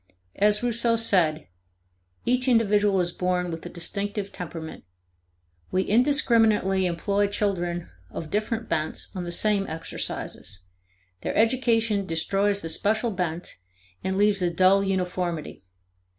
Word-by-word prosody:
As 210 +2 +3
Rouseau 235 -1 +2
said: 180 -9 +2 0.8
"Each 250 +1 +1
individual 210 -4 +3
is 175 0 -1
born 180 0 -1
with 165 0 -6
a - - -7
distinctive 200 +3 -3
temperament. 165 -2 -7 0.9
We 185 +1 +1
indiscriminately 225 -6 +3
employ 200 +4 0
children 175 -4 -1 0.2
of 160 -2 -7
different 220 +2 -1
bents 155 -1 -2
on 180 -2 -4
the 175 - -4
same 200 +2 +2
exercises; 130 - -5 0.6
their - - -3
education 225 -3 +2
destroys 195 +5 +1
the 165 - -4
special 220 +7 +1
bent 175 -3 -3 0.5
and 190 0 -1
leaves 205 -1 +3
a 175 - +2
dull 185 +3 +4
uniformity. 180 -4 -2
195 Hz, 120 wpm, -25 LUFS, 175-215 Hz, 0.9 s, dull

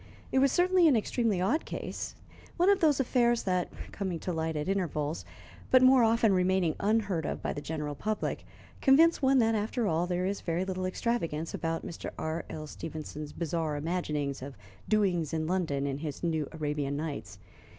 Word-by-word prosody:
It 265 - +3
was 275 0 +4
certainly 360 0 +4
an 290 - +5
extremely 220 -2 0
odd 235 - +1
case - - -5 0.4
one 365 +3 +5
of 400 - +3
those 300 -5 +3
affairs 240 -2 +2
that, 180 -2 0 0.2
coming 190 -4 -3
to 180 - -2
light 160 0 -2
at 150 +2 -2
intervals, 165 -5 -1 0.4
but 255 0 +6
more 255 -1 +7
often 225 -2 +4
remaining 185 -2 +2
unheard 200 -5 +1
of - - -4
by - - -1
the 145 - -5
general 150 -1 -4
public, 215 +9 -2 0.4
convince 320 +5 +5
one 270 0 +4
that, 225 -2 +4
after 220 +2 -1
all, 170 -1 +1
there 180 0 -1
is 200 +1 -2
very 170 +2 -1
little 185 -1 -2
extravagance 170 -7 -2
about 165 0 -2
Mr. 170 - -6
R.L. 160 -1 -4
Stevenson's 150 -1 -7
bizarre 165 -2 -2
imaginings 150 -3 -2
of 135 0 -8 0.3
doings 180 -8 +1
in 155 0 -1
London 160 -6 0
in 140 0 -2
his 150 0 -5
"New 160 -4 0
Arabian 145 -3 -2
Nights." 140 -11 -5
180 Hz, 175 wpm, -30 LUFS, 155-225 Hz, 0.4 s, more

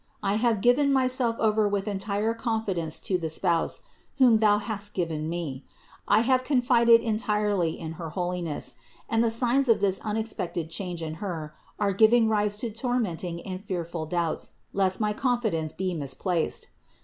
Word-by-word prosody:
I 200 +1 +1
have 225 -3 +1
given 275 +5 +4
my 265 -1 +3
self 250 -2 +1
over 215 -1 +2
with 200 0 -1
entire 205 +2 -1
confidence 220 -9 -2
to 185 -2 0
the 160 -2 -3
Spouse 170 +1 0 0.3
whom 245 -5 +6
thou 210 -1 +4
hast 210 -1 -4
given 160 -3 -2
me. 155 -6 -4 0.4
I 210 +2 +5
have 255 +2 +2
confided 245 -3 +4
entirely 210 -6 0
in 160 -1 -5
her 165 - -4
holiness; 175 -2 -3 0.3
and 225 0 +2
the 230 - +2
signs 245 +3 +2
of 230 - +5
this 195 -1 +1
unexpected 210 -7 -3
change 175 -1 -4
in 155 -1 -4
Her 155 -4 -5 0.2
are 200 -2 +1
giving 225 +3 +5
rise 210 -1 +1
to 230 - -3
tormenting 205 -8 -2
and 185 0 -6
fearful 170 -4 -4
doubts 170 -1 -2 0.2
lest 190 -1 +1
my 210 -1 +1
con 245 +2 0
fidence 165 -9 -1
be 185 -1 -3
misplaced. 160 +3 -2
205 Hz, 165 wpm, -26 LUFS, 170-230 Hz, 0.4 s, whom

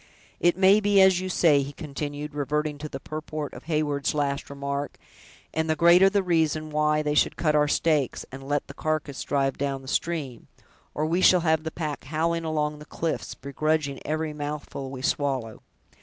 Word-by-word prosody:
It 175 0 +3
may 190 +2 +6
be 205 -1 +3
as 190 -1 +6
you 185 0 -4
say," 155 -5 +4
he 140 +1 -5
continued, 145 0 -5
reverting 150 +1 -2
to 150 +1 -6
the 135 - -6
purport 155 0 -5
of - - -11
Heyward's 150 -3 0
last 140 -1 -1
remark; 140 0 -4 0.6
"and 160 0 -1
the 160 - +2
greater 175 +4 +6
the 200 0 +1
reason 160 -3 +1
why 150 0 +2
we 150 0 0
should 150 - +2
cut 155 -2 +1
our 150 0 +3
steaks, 150 -3 +1
and 130 +1 -8
let 145 +1 -1
the - - -10
carcass 155 -3 -2
drive 135 -2 0
down 135 -1 -2
the - - -12
stream, 140 -6 -2 0.5
or 155 - 0
we 170 +4 +1
shall 180 -1 +6
have 160 -2 +2
the 160 - -3
pack 155 -4 -5
howling 165 +3 -1
along 150 -1 -1
the 150 - -11
cliffs, 165 +1 -3
begrudging 140 +1 -1
every 155 0 -2
mouthful 145 -2 -5
we 130 -1 -7
swallow. 135 -6 -1
150 Hz, 185 wpm, -26 LUFS, 140-160 Hz, 0.6 s, may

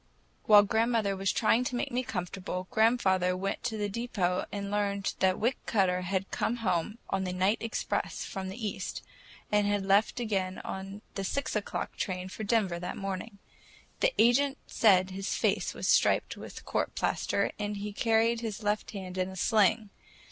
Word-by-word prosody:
While 210 -1 +8
grandmother 220 -1 +1
was 195 0 0
trying 230 +2 +3
to 250 - -2
make 245 - -2
me 245 +1 0
comfortable, 185 -3 -4
grandfather 190 -5 +3
went 195 +1 -2
to 225 -3 -1
the 205 -1 -1
depot 195 -4 -1
and 200 -1 -4
learned 200 -1 0
that 190 -1 +3
Wick 240 +4 +1
Cutter 185 -4 +2
had 190 +1 -2
come 235 - 0
home 180 +5 0
on 195 0 0
the 185 - -2
night 190 +4 +1
express 230 0 -2
from 190 -1 -5
the 190 - -7
east, 190 -2 -5 0.5
and 210 -1 +3
had 205 -1 0
left 200 +5 +3
again 195 -5 -1
on 195 +2 -6
the 195 - -3
six 260 +7 -2
o'clock 210 - -3
train 185 -1 -3
for 215 - -6
Denver 200 -5 +1
that 180 +1 -5
morning. 195 +2 -5 0.6
The - - +3
agent 270 +4 +4
said 190 -4 +4
his 195 +1 -3
face - - 0
was - - -3
striped - - +3
with - - -10
court - - -1
plaster, - - 0
and 210 0 -2
he 205 +1 -5
carried 225 +2 +2
his 220 -2 -4
left 210 +1 0
hand 185 -2 -6
in 185 0 0
a 190 - -9
sling. 215 +1 +2
200 Hz, 175 wpm, -30 LUFS, 190-220 Hz, 0.6 s, While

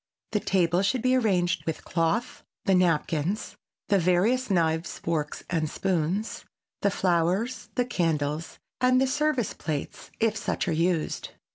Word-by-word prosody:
The 215 - +1
table 180 -3 +2
should 220 +5 0
be 255 0 +3
arranged 185 -7 +1
with 160 - -3
cloth, 170 +9 -1 0.2
the 195 - +3
napkins, 180 +2 +1 0.3
the 200 -2 +4
various 195 +9 +2
knives, 165 -3 +1
forks 155 -3 -2
and 160 -3 0
spoons, 190 +4 -1 0.4
the 200 - +3
flowers, 185 +7 0
the 245 - +2
candles, 160 -7 -1 0.2
and 255 0 +4
the 265 - +4
service 295 -3 0
plates, 150 -3 -5
if 225 -1 +2
such 220 - -2
are - - +1
used. 165 0 0
185 Hz, 140 wpm, -27 LUFS, 165-220 Hz, 0.4 s, the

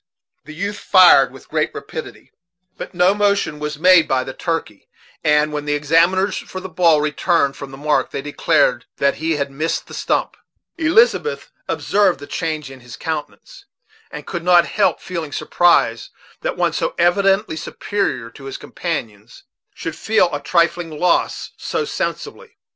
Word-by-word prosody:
The 155 - -10
youth 200 +4 -4
fired 180 -8 +6
with - - -15
great - - 0
rapidity, - - -8 0.4
but - - -9
no 180 +2 +4
motion 200 -7 0
was 150 -1 -4
made 180 +1 +5
by 130 -1 +1
the 130 - -7
turkey; 165 - -4 0.3
and, 150 0 +2
when 150 -1 -4
the 145 0 0
examiners 170 +6 +2
for 185 - -8
the 185 - -12
ball 170 -4 +3
returned 150 -1 +1
from 140 - -8
the 135 - -11
"mark," 150 +2 0
they 135 - -5
declared 145 - +1
that 140 0 +1
he 165 0 0
had 140 -1 -2
missed 155 +4 -2
the - - -13
stump. - - -1 0.4
Elizabeth 450 +7 +2 0.2
observed 195 -7 +1
the 145 - -9
change 155 -3 -4
in 135 - -12
his 120 -1 -12
countenance, 160 - -6 0.4
and - - -9
could 170 -2 -5
not 175 -1 +5
help 210 - +1
feeling 165 -5 -6
surprise 145 -8 +2 0.3
that - - -3
one - - +1
so - - -2
evidently 195 +2 +2
superior 160 - -3
to 135 - -13
his 135 - -6
companions 115 - -6 0.3
should 165 -1 -5
feel 215 -7 +1
a 145 - -3
trifling 170 +2 +1
loss 180 -1 0
so 450 - -2
sensibly. 465 +1 -5
165 Hz, 160 wpm, -19 LUFS, 145-185 Hz, 0.4 s, fired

